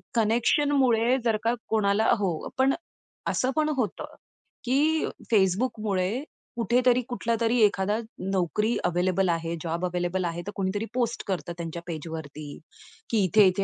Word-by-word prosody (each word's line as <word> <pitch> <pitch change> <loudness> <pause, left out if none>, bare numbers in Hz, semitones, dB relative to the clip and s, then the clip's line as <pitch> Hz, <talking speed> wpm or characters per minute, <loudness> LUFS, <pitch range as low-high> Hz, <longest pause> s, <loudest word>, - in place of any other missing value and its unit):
कनेक्शनमुळे 240 +2 +3
जर 220 -2 +3
का 230 +1 +2 0.2
कोणाला 215 0 +2
हो. 175 -6 -1
पण 270 +1 +4 0.6
असं 260 +1 +1
पण 310 0 +2
होतं, 215 -7 -3 0.5
की 300 +5 +2 0.3
Facebookमुळे 205 +2 +1 0.3
कुठेतरी 245 +1 +3
कुठलातरी 235 0 0
एखादा 205 0 +3 0.3
नोकरी 195 +5 +1
अवेलेबल 180 +1 +1
आहे, 165 0 -1
जॉब 170 +2 -2
अवेलेबल 180 +1 -1
आहे. 170 0 -3
तर 205 - -3
कोणीतरी 200 +3 -1
पोस्ट 235 -2 -1
करतं 175 -2 -2
त्यांच्या 170 0 -5
पेजवरती, 160 -2 -6 0.7
की 220 -4 +2
इथे-इथे 195 0 +4
205 Hz, 125 wpm, -26 LUFS, 180-235 Hz, 0.7 s, पण